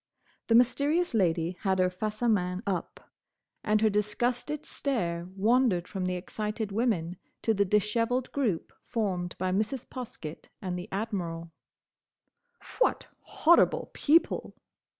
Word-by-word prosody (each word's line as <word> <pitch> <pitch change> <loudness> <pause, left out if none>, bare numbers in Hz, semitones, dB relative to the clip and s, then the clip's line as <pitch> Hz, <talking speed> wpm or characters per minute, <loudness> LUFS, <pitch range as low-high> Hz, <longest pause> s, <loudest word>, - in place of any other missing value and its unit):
The 230 - +4
Mysterious 285 +8 +3
Lady 170 -5 +2
had 190 -2 +1
her 185 0 +2
face 215 +4 -4
à 240 -1 +4
main 180 -1 0
up, 185 -4 -4 0.6
and 215 0 +2
her 220 - +5
disgusted 245 +8 -1
stare 175 -11 -2
wandered 215 -3 +3
from 190 -2 -3
the 180 - -1
excited 210 +3 -4
women 195 -6 0 0.3
to 225 - +3
the 200 -1 +2
dishevelled 230 +5 +1
group 230 - -1
formed 185 -7 -2
by 185 0 -1
Mrs. 215 +6 -1
Poskett 195 -11 -7
and 185 -2 -3
the 180 +4 -6
Admiral. 175 -6 -3 1.3
"What - - +2
horrible 340 +2 +3
people!" 320 +3 +2
210 Hz, 130 wpm, -29 LUFS, 180-240 Hz, 1.3 s, her